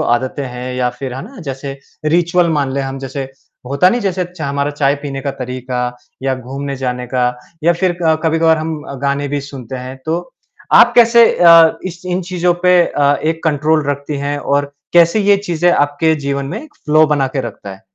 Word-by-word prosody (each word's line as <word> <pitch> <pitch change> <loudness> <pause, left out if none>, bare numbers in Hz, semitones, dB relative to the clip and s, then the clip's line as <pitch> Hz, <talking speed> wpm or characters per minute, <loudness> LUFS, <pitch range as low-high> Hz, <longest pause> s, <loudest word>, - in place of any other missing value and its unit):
आदतें 130 +3 0
हैं 125 +1 -6
या 125 -1 0
फ़िर 130 -2 -5
है 135 - -6
ना 260 +6 -13
जैसे 135 +1 -6 0.3
रिचुअल 170 +2 +2
मान 135 -2 -1
लें 140 - -1
हम 135 0 -5
जैसे 135 +1 -5 0.4
होता 140 +7 +3
नहीं 240 +6 0
जैसे 185 -3 -1
चा 175 -4 -7
हमारा 140 +1 -1
चाय 145 -1 +1
पीने 135 -2 -4
का 140 +1 -2
तरीका 125 0 -4 0.4
या 135 -1 0
घूमने 135 +2 -6
जाने 125 -1 -3
का 125 -1 +2 0.4
या 170 - +5
फ़िर 175 0 0
क 160 -1 +3
कभी-कभार 160 0 +3
हम 155 -1 -4 0.2
गाने 140 0 0
भी 145 0 -2
सुनते 135 -3 -8
हैं, 130 +1 -7
तो 175 +9 -3 0.4
आप - - +7
कैसे 235 0 +7
अ, 165 -2 +6
इस 175 -1 -8
इन 180 0 -1
चीज़ों 180 0 0
पे 180 0 +5
अ, 145 0 +2
एक 160 +1 -1
कंट्रोल 155 0 +1
रखती 145 +1 -4
हैं 145 +1 -2
और 145 0 -1 0.2
कैसे 170 +4 +5
ये 200 0 +4
चीज़ें 175 -3 0
आपके 145 +3 +2
जीवन 140 0 -1
में 175 - -6
फ़्लो 155 - +3
बना 145 -3 +1
के 135 +1 -2
रखता 110 -4 -7
है? 95 - -13
145 Hz, 195 wpm, -16 LUFS, 135-170 Hz, 0.4 s, आप